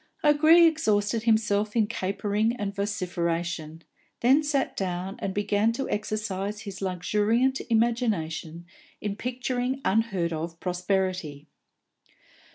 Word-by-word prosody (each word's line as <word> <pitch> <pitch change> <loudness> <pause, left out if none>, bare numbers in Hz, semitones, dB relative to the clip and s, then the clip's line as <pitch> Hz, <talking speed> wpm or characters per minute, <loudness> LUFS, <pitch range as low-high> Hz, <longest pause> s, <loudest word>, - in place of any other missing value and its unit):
O'Gree 310 +3 +6
exhausted 220 -9 +2
himself 215 -2 +2
in 225 -2 +4
capering 205 +2 -1
and 205 -4 -3
vociferation, 175 -5 -3 0.4
then 265 +5 +5
sat 290 -3 -1
down 185 0 -3
and 195 - -2
began 205 +2 +1
to 270 +3 -3
exercise 210 -1 -3
his 200 -3 -8
luxuriant 210 +8 +1
imagination 200 -9 0 0.3
in 205 -1 -3
picturing 250 +2 -2
unheard 195 -5 +1
of 165 +1 -5
prosperity. 180 -5 -2
205 Hz, 105 wpm, -26 LUFS, 180-230 Hz, 0.4 s, O'Gree